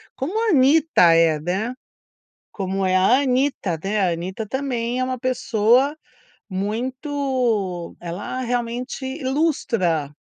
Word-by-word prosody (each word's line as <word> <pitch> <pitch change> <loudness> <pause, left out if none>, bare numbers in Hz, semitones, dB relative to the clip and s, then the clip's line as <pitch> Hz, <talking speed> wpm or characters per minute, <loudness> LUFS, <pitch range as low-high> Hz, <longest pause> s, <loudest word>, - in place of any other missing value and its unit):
Como 345 +12 -2
a - - +3
Anitta 280 - +5
é, 165 -2 +4
né. 190 +9 -2 0.8
Como 195 -1 -2
é 185 - +1
a 210 +8 +4
Anitta, 255 - 0
né, 205 +2 -1
a 185 -3 +2
Anitta 185 +6 -5
também 250 -1 -2
é - - +1
uma 255 0 -3
pessoa 250 +2 +2 0.5
muito 235 - -2
ela 175 +9 -5
realmente 250 +3 -3
lustra 230 - 0
235 Hz, 115 wpm, -22 LUFS, 190-265 Hz, 0.8 s, Anitta